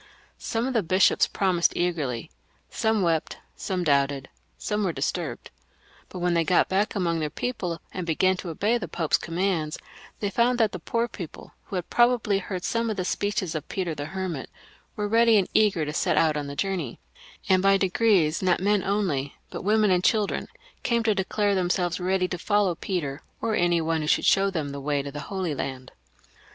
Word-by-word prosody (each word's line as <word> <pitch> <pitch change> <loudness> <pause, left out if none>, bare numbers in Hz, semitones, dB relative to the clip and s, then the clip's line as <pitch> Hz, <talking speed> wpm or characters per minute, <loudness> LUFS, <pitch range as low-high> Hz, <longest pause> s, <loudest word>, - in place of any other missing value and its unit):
Some 230 0 -2
of 265 - -2
the 230 - +3
bishops 185 +2 +3
promised 185 -3 +1
eagerly; 150 - -1 0.2
" - - -38
some 220 -2 +1
wept, 165 -2 0 0.2
some 185 -2 -2
doubted, 140 -3 +1 0.3
some 210 0 -2
were 185 - +1
disturbed - - -3 0.3
;" - - -29
but - - -8
when 175 0 +1
they 170 -1 +3
got 180 +2 +3
back 200 +4 0
among 170 -4 0
their 155 -1 -1
people 180 - -3
and 185 - -3
began 180 +3 +2
to 180 - -6
obey 210 +9 +1
the 175 - -5
Pope's 160 0 +1
commands, 165 -3 -1 0.4
they 205 -1 -2
found 240 +3 +2
that 220 -3 +3
the 185 - -6
poor 230 +7 -1
people, 180 -8 -9
who - - -7
had 180 -2 -3
pro 240 +1 +5
bably 205 -3 0
heard 185 -1 -5
some 230 0 0
of 215 - -3
the 185 - -1
speeches 205 -3 -1
of 155 -1 -5
Peter 180 -4 -2
the 145 -1 -5
Hermit, 180 -4 -4 0.5
were 210 -1 -2
ready 230 +1 +5
and 195 - +2
eager 200 -7 +3
to 150 - -4
set - - +1
out 160 -2 +3
on 145 -1 -3
the 140 - -6
journey, 180 -8 -2 0.5
and 185 -1 +4
by 195 0 +5
degrees 190 -4 +2
not 185 -2 +2
men 205 +1 +2
only 180 -9 -1 0.2
but - - -5
women 210 0 +3
and 180 -1 +2
children 210 -1 +1 0.3
came 235 -1 +1
to 220 -1 +3
declare 200 +1 0
themselves 180 -1 0
ready 185 0 +1
to 180 -1 -5
follow 205 -1 +2
Peter, 160 -5 -3 0.2
or 225 - -1
any 175 -3 +2
one 165 0 0
who - - -2
would - - -5
show 195 0 +4
them 160 -6 -3
the 140 0 -6
way 145 0 0
to 140 - -6
the 145 - -6
Holy 190 -5 -2
Land. 130 -2 -5
185 Hz, 205 wpm, -26 LUFS, 160-205 Hz, 0.5 s, pro